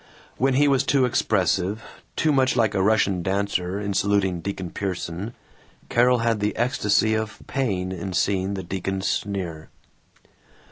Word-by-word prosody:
When 135 Hz, 0 st, +2 dB
he 145 Hz, +2 st, +4 dB
was 135 Hz, -2 st, +3 dB
too 135 Hz, -2 st, +3 dB
expressive, 100 Hz, -3 st, +1 dB, 0.3 s
too 155 Hz, -, +2 dB
much 130 Hz, -3 st, +3 dB
like 115 Hz, -3 st, +2 dB
a 95 Hz, -, +1 dB
Russian 100 Hz, -3 st, +2 dB
dancer, 95 Hz, 0 st, -1 dB
in 100 Hz, -1 st, -2 dB
saluting 95 Hz, -3 st, +1 dB
Deacon 95 Hz, -2 st, -5 dB
Pierson, 95 Hz, +2 st, -4 dB, 0.5 s
Carol 125 Hz, +1 st, +4 dB
had 115 Hz, -2 st, +2 dB
the 105 Hz, +1 st, -1 dB
ecstasy 110 Hz, -3 st, +2 dB
of 110 Hz, -1 st, -2 dB
pain 95 Hz, -9 st, -1 dB
in 95 Hz, +1 st, -5 dB
seeing 95 Hz, +1 st, 0 dB
the 95 Hz, -, -4 dB
deacon's 95 Hz, +1 st, -3 dB
sneer. 90 Hz, -6 st, -3 dB
100 Hz, 145 wpm, -24 LUFS, 95-115 Hz, 0.5 s, he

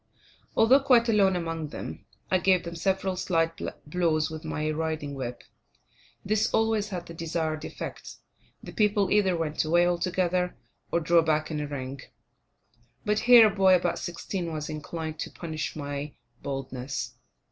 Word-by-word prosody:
Although 245 Hz, +5 st, +6 dB
quite 250 Hz, -4 st, +4 dB
alone 195 Hz, -4 st, +4 dB
among 165 Hz, -2 st, -3 dB
them, 80 Hz, -, -8 dB, 0.2 s
I 185 Hz, -, +4 dB
gave 185 Hz, 0 st, +3 dB
them 170 Hz, 0 st, -6 dB
several 190 Hz, +2 st, 0 dB
slight 165 Hz, -2 st, 0 dB, 0.2 s
blows 155 Hz, -1 st, +1 dB
with 160 Hz, -1 st, -7 dB
my 155 Hz, +1 st, -2 dB
riding 155 Hz, -2 st, -3 dB
whip. 125 Hz, -3 st, -5 dB, 0.8 s
This 215 Hz, +1 st, +1 dB
always 220 Hz, -2 st, +1 dB
had 180 Hz, -3 st, -5 dB
the 170 Hz, -, -9 dB
desired 160 Hz, -1 st, -2 dB
effect; -, -, -7 dB, 0.5 s
the -, -, -8 dB
people 210 Hz, -2 st, +2 dB
either 190 Hz, -4 st, +3 dB
went 160 Hz, -2 st, -1 dB
away 170 Hz, +2 st, +3 dB
altogether 180 Hz, 0 st, 0 dB, 0.3 s
or 170 Hz, -, +1 dB
drew 170 Hz, +1 st, +4 dB
back 155 Hz, 0 st, 0 dB
in 155 Hz, -, -2 dB
a 150 Hz, -, -3 dB
ring. 135 Hz, -1 st, -5 dB, 1.0 s
But 210 Hz, 0 st, +2 dB
here, 240 Hz, -2 st, +10 dB
a 210 Hz, -2 st, +1 dB
boy 190 Hz, -2 st, +6 dB
about 175 Hz, -1 st, 0 dB
sixteen 175 Hz, 0 st, -4 dB
was 155 Hz, -1 st, -4 dB
inclined 155 Hz, 0 st, -5 dB
to -, -, -3 dB
punish 160 Hz, -2 st, -5 dB
my 145 Hz, -1 st, -5 dB, 0.3 s
boldness. 135 Hz, -1 st, -4 dB
165 Hz, 155 wpm, -27 LUFS, 155-190 Hz, 1.0 s, here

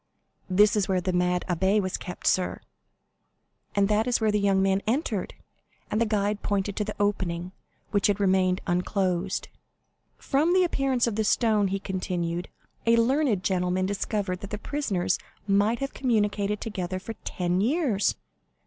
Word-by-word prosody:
"This 205 Hz, +4 st, +5 dB
is 205 Hz, -3 st, +1 dB
where 190 Hz, -1 st, +1 dB
the 185 Hz, +1 st, -2 dB
mad 180 Hz, 0 st, +1 dB
abbé 190 Hz, +4 st, +2 dB
was 185 Hz, -2 st, -2 dB
kept, 180 Hz, -, -7 dB
sir, 185 Hz, -1 st, +1 dB, 1.2 s
and 200 Hz, -1 st, +3 dB
that 215 Hz, +2 st, +1 dB
is 245 Hz, -, +2 dB
where 220 Hz, -1 st, +2 dB
the 210 Hz, -, +1 dB
young 200 Hz, -1 st, +2 dB
man 195 Hz, 0 st, +2 dB
entered;" 225 Hz, -, -1 dB, 0.6 s
and 215 Hz, -, +1 dB
the 230 Hz, -, +3 dB
guide 210 Hz, -1 st, 0 dB
pointed 200 Hz, -1 st, -1 dB
to 210 Hz, -, +1 dB
the 215 Hz, 0 st, -5 dB
opening, 185 Hz, -4 st, -1 dB, 0.4 s
which 205 Hz, -2 st, +3 dB
had 205 Hz, 0 st, +1 dB
remained 185 Hz, -2 st, +2 dB
unclosed. 185 Hz, 0 st, -1 dB, 0.7 s
"From 310 Hz, +6 st, +1 dB
the 370 Hz, -, +5 dB
appearance 270 Hz, -7 st, +1 dB
of 225 Hz, -3 st, -2 dB
the 220 Hz, -, +2 dB
stone," 215 Hz, -2 st, +2 dB
he 195 Hz, +1 st, -1 dB
continued, 180 Hz, -3 st, -3 dB, 0.4 s
"a 230 Hz, -, +6 dB
learned 240 Hz, -4 st, +2 dB
gentleman 180 Hz, 0 st, +1 dB
discovered 200 Hz, -1 st, -2 dB
that 200 Hz, -, -8 dB
the 210 Hz, -, -3 dB
prisoners 205 Hz, -8 st, -1 dB, 0.3 s
might 205 Hz, +3 st, +3 dB
have 275 Hz, -, -3 dB
communicated 210 Hz, -4 st, 0 dB
together 185 Hz, -4 st, -3 dB
for 195 Hz, +4 st, -6 dB
ten 180 Hz, +1 st, -1 dB
years. 250 Hz, -, +1 dB
200 Hz, 160 wpm, -26 LUFS, 185-220 Hz, 1.2 s, a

